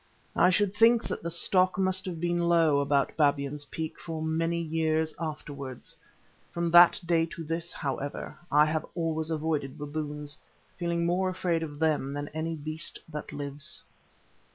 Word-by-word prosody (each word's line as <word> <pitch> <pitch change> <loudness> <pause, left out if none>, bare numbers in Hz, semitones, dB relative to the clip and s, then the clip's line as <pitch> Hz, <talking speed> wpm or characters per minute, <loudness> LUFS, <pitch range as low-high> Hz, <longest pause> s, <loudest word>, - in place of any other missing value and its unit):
I - - +5
should 200 +1 +2
think 230 +2 +5
that - - -4
the 170 - -3
stock 185 +2 +3
must 190 -1 +1
have 175 -3 -4
been 175 0 +1
low 165 -4 +4
about 140 0 +1
Babyan's 145 -1 +1
Peak 160 +1 -5
for 165 -2 -5
many 165 +2 0
years 160 -1 0
afterwards. 145 -5 -5 0.6
From 170 -1 -1
that 175 0 +8
day 165 -1 +2
to 165 - -7
this, 165 +2 -3
however, 140 -1 -4 0.2
I 150 +1 +6
have 155 0 -1
always 160 -2 -1
avoided 155 -4 -2
baboons, 150 0 -4 0.4
feeling 170 -1 -1
more 185 +2 +1
afraid 175 -3 0
of 150 -3 -5
them 150 -3 +1
than 145 0 -4
any 160 +1 -3
beast 155 +2 -4
that 150 -1 -6
lives. 145 +3 -4
160 Hz, 155 wpm, -29 LUFS, 150-170 Hz, 0.6 s, that